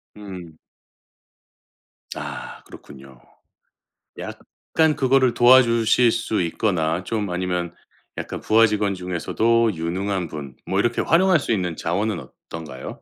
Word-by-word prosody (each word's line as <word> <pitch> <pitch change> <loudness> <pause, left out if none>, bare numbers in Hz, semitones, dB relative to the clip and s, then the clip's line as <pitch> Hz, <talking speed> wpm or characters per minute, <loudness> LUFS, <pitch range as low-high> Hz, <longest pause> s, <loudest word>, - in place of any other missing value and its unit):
음. 90 -6 -10 1.6
아 - - -7
그렇군요. 65 -2 -14 1.0
약간 160 -2 -2
그거를 130 -2 +3
도와주실 120 -1 +5
수 115 -2 -1
있거나 85 -2 -1
좀 105 -2 -2
아니면 90 -1 -2 0.4
약간 - - -5
부하 115 +1 +5
직원 105 -2 0
중에서도 110 +6 +1
유능한 90 +2 -2
분 70 -4 -8
뭐 95 - 0
이렇게 120 +3 +1
활용할 180 0 +4
수 140 - -3
있는 90 -6 -1
자원은 100 +4 -1
어떤가요? 75 -6 -10
100 Hz, 250 characters per minute, -22 LUFS, 85-115 Hz, 1.6 s, 도와주실